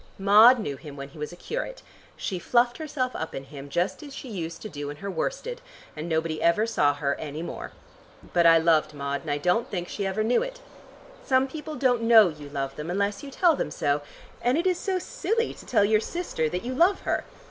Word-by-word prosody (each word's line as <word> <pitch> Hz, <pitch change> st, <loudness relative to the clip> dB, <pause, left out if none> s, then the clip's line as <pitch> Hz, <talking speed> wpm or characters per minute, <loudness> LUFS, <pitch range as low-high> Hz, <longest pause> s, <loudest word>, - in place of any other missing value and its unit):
Maud 210 Hz, +6 st, +7 dB
knew 145 Hz, -, -4 dB
him 145 Hz, 0 st, -10 dB
when 140 Hz, 0 st, -7 dB
he 150 Hz, -, -14 dB
was 150 Hz, +2 st, -4 dB
a -, -, -9 dB
curate. -, -, -5 dB, 0.3 s
She 185 Hz, -, -3 dB
fluffed 240 Hz, -, +2 dB
herself 280 Hz, -5 st, -2 dB
up 160 Hz, -, -4 dB
in 135 Hz, -, -5 dB
him, 140 Hz, 0 st, -10 dB
just 180 Hz, +5 st, -1 dB
as 285 Hz, -2 st, -9 dB
she 265 Hz, -, -8 dB
used 170 Hz, -5 st, -5 dB
to -, -, -4 dB
do 145 Hz, -6 st, -6 dB
in 145 Hz, -, -7 dB
her 200 Hz, +5 st, -5 dB
worsted, -, -, -3 dB, 0.3 s
and 155 Hz, +2 st, -5 dB
nobody 160 Hz, -1 st, -1 dB
ever 170 Hz, +6 st, +3 dB
saw 145 Hz, -11 st, +2 dB
her 140 Hz, -1 st, 0 dB
any 155 Hz, +1 st, -5 dB
more. -, -, -6 dB, 0.6 s
But 170 Hz, -1 st, +5 dB
I 165 Hz, 0 st, +8 dB
loved 160 Hz, -2 st, +2 dB
Maud, 140 Hz, 0 st, -3 dB
and 160 Hz, -, -8 dB
I 145 Hz, -, +1 dB
don't 180 Hz, +9 st, +1 dB
think 175 Hz, -3 st, -3 dB
she 200 Hz, -2 st, -3 dB
ever 195 Hz, +3 st, -1 dB
knew 235 Hz, +3 st, +3 dB
it. -, -, -5 dB, 0.6 s
Some 260 Hz, 0 st, +3 dB
people 305 Hz, +2 st, -7 dB
don't 250 Hz, -4 st, +2 dB
know 225 Hz, -4 st, +7 dB
you 150 Hz, -3 st, -9 dB
love 135 Hz, -1 st, -4 dB
them 150 Hz, +2 st, -5 dB
unless 200 Hz, +3 st, -1 dB
you 285 Hz, -, -8 dB
tell 335 Hz, +3 st, +3 dB
them -, -, -2 dB
so, 145 Hz, 0 st, 0 dB, 0.4 s
and 245 Hz, +4 st, +2 dB
it 340 Hz, -, 0 dB
is 365 Hz, -2 st, +2 dB
so 380 Hz, -2 st, -1 dB
silly 460 Hz, +3 st, -1 dB
to -, -, -14 dB
tell 210 Hz, -5 st, +4 dB
your 215 Hz, +1 st, +3 dB
sister 225 Hz, -, -2 dB
that 180 Hz, +7 st, -4 dB
you 255 Hz, -, -2 dB
love 345 Hz, +9 st, +3 dB
her. -, -, -1 dB
195 Hz, 230 wpm, -26 LUFS, 155-260 Hz, 0.6 s, I